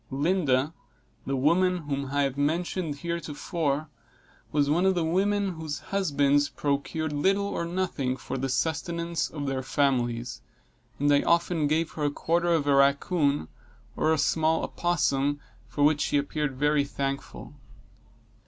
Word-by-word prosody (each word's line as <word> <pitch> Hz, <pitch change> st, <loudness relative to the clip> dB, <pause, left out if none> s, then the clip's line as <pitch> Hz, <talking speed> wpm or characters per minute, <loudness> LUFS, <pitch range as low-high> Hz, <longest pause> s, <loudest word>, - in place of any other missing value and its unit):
Lydia, 145 Hz, -1 st, +1 dB, 0.5 s
the 135 Hz, -, 0 dB
woman 175 Hz, +7 st, +3 dB
whom 140 Hz, -1 st, -3 dB
I 145 Hz, +1 st, +1 dB
have 135 Hz, -1 st, -1 dB
mentioned 160 Hz, +2 st, -1 dB
heretofore, 155 Hz, -2 st, -2 dB, 0.6 s
was 145 Hz, -1 st, +2 dB
one 170 Hz, +6 st, +2 dB
of 190 Hz, -, +3 dB
the 175 Hz, -, +1 dB
women 195 Hz, +4 st, +1 dB
whose 160 Hz, -3 st, -5 dB
husbands 145 Hz, -7 st, +1 dB
procured 145 Hz, +2 st, -2 dB
little 195 Hz, +7 st, +2 dB
or 200 Hz, -4 st, -2 dB
nothing 170 Hz, -8 st, -2 dB
for 135 Hz, -, -6 dB
the 135 Hz, 0 st, -2 dB
sustenance 170 Hz, +4 st, -1 dB
of 145 Hz, -2 st, -5 dB
their 135 Hz, -1 st, -1 dB
families, 125 Hz, -3 st, 0 dB, 0.6 s
and 145 Hz, +1 st, +3 dB
I 140 Hz, -, +4 dB
often 170 Hz, -2 st, +2 dB
gave 160 Hz, +2 st, 0 dB
her 150 Hz, -, -3 dB
a -, -, +3 dB
quarter 170 Hz, +4 st, 0 dB
of 160 Hz, -4 st, +2 dB
a 145 Hz, -, +3 dB
rackoon 140 Hz, +2 st, +2 dB, 0.5 s
or 155 Hz, -, +2 dB
a 160 Hz, -, +3 dB
small 160 Hz, +2 st, +2 dB
opossum, 145 Hz, -4 st, 0 dB, 0.3 s
for 145 Hz, -, -1 dB
which 150 Hz, 0 st, +4 dB
she 145 Hz, -, +1 dB
appeared 145 Hz, -1 st, -2 dB
very 150 Hz, +1 st, +2 dB
thankful. 140 Hz, 0 st, -5 dB
150 Hz, 145 wpm, -27 LUFS, 140-170 Hz, 0.6 s, I